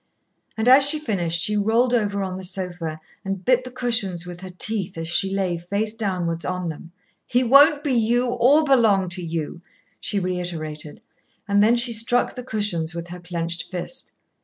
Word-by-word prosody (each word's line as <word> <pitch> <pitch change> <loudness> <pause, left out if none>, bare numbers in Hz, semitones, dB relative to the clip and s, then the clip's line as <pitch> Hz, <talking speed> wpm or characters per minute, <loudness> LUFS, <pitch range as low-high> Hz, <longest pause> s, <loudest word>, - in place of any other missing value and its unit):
And 220 +2 -1
as 265 +2 +7
she 310 - +5
finished, 175 - -2
she 210 - +1
rolled 225 +4 +2
over 205 -4 0
on 185 -1 -4
the 190 - -8
sofa, 175 -4 -4 0.2
and 195 -1 -5
bit 255 0 +3
the 255 - -8
cushions 225 -9 0
with 175 0 -9
her 190 - -8
teeth 190 0 -1
as 165 0 -4
she 190 +3 +2
lay 185 -3 -1
face 200 +5 -2
downwards 180 -6 -2
on 180 -1 -3
them. 165 +2 -9 0.4
"He 250 +1 +1
won't 285 +4 +5
be 285 -4 0
you, 240 +1 +2
or 250 +5 +3
belong 220 -10 +3
to 180 +1 -3
you," 165 0 -5 0.4
she 205 - -3
reiterated, 170 -5 -5 0.4
and 200 0 +3
then 225 +3 +4
she 235 0 +2
struck 240 +2 +1
the 250 - -7
cushions 205 -9 -1
with 170 0 -6
her 180 +1 -8
clenched 170 -1 -4
fist. 185 +8 -7
195 Hz, 185 wpm, -22 LUFS, 175-235 Hz, 0.4 s, as